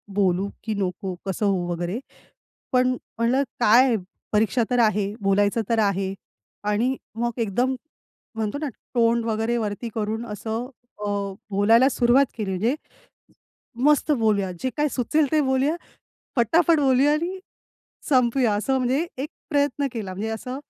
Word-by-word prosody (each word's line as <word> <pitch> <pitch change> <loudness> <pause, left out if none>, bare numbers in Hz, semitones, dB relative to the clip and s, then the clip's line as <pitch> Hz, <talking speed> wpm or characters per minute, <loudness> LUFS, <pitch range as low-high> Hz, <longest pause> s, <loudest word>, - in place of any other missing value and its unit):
बोलू 195 0 +2
की 220 - -2
नको? 190 -1 -3
कसं 195 +2 -1
होऊ? 185 -3 +1
वगैरे 175 +6 -2 0.7
पण 250 0 +4 0.3
म्हटलं 245 +4 +2 0.2
काय 240 +2 +5 0.4
परीक्षा 220 +3 +2
तर 245 -1 +2
आहे, 205 -1 +1
बोलायचं 205 +3 +2
तर 230 -1 +2
आहे 195 -2 +1 0.6
आणि 235 +6 +1 0.2
मग 235 +1 -1
एकदम 240 +5 +1 0.6
म्हणतो 220 +3 -2
ना 300 - -1 0.3
तोंड 230 0 +3
वगैरे 225 +1 0
वरती 220 +1 -3
करून 220 +2 -2
असं 225 +2 -4 0.4
अ, - - -1 0.4
बोलायला 225 +7 +5
सुरुवात 250 +2 +4
केली 210 -3 -2
म्हणजे 220 +9 +1 1.1
मस्त 300 0 +4
बोलूया, 215 -6 +1
जे 260 - 0
काय 300 0 +2
सुचेल 285 +4 +1
ते 310 - +4
बोलूया, 265 +4 +1 0.6
फटाफट 315 +7 +4
बोलूया 270 +2 +4
आणि 345 +5 -1 0.7
संपवूया, 250 -3 +3
असं 265 +6 0
म्हणजे 260 +6 +1
एक 280 +3 -3 0.2
प्रयत्न 285 0 +1
केला. 205 -5 -4
म्हणजे 210 +4 -3
असं 250 +4 -5
230 Hz, 140 wpm, -24 LUFS, 205-265 Hz, 1.1 s, काय